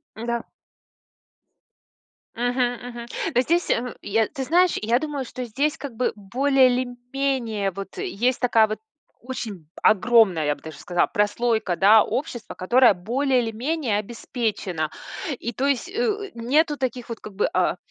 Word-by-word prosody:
Да. 235 +1 -3 1.9
Мгм, 245 0 -1
мгм. 235 -1 -7 0.3
Но 245 - +5
здесь 340 +6 +1
мгм, 245 0 0
я, 220 +1 +1
ты 275 -3 -5
знаешь, 350 +6 +3
я 230 +3 +2
думаю, 290 -2 -3
что 255 +1 -6
здесь, 280 +7 -1
как 265 -4 -7
бы, 250 - +1
более 260 +6 +3
или 250 +1 0 0.2
менее 245 -7 0
вот 195 +1 -8
есть 245 +5 0
такая 230 -3 +4
вот 215 0 -4 0.4
очень 220 - -6
огромная, 215 -6 +4
я 145 - +2
бы - - -20
даже 160 0 -9
сказала, 175 -1 +1
прослойка, 210 -2 +1
да, 215 +2 +7
общества, 250 -5 -4
которая 240 +6 +5
более 250 +8 +1
или 225 -1 -2
менее 250 -1 -1
обеспечена. 210 - -3 0.5
И 235 - -4
то 265 - -1
есть, 280 +4 0
э, 460 +5 0
у 410 -1 -3
нету 295 +6 +2
таких 255 -2 -3
вот, 230 - -5
как 215 - -9
бы, 210 - +2
а, - - +1
240 Hz, 160 wpm, -24 LUFS, 215-265 Hz, 1.9 s, да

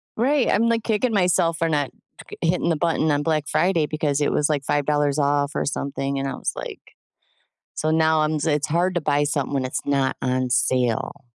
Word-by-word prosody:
Right, 265 +3 +2
I'm, 230 +2 +2
like, 230 -1 0
kicking 225 +1 0
myself 175 -3 +2
for 165 -1 0
not 145 -4 0 0.4
c - - -9
hitting 170 +1 +1
the 165 - +2
button 160 -1 +1
on 145 0 0
Black 155 -2 0
Friday 170 -4 +1
because 150 -2 -1
it - - +1
was, 150 +1 +1
like, 145 -2 0
$5 145 0 0
off 145 0 +1
or - - -1
something, 140 -1 -3
and 135 - -2
I - - -3
was - - -3
like - - -7 1.0
"So 155 - -1
now 160 0 +3
I'm" 155 0 0
It's 150 -3 +1
hard 175 +4 +1
to - - +2
buy 145 -1 +1
something 145 -1 -2
when 135 -2 0
it's 130 - -3
not 140 -2 0
on 130 -1 0
sale. 125 +2 0
150 Hz, 205 wpm, -23 LUFS, 140-165 Hz, 1.0 s, now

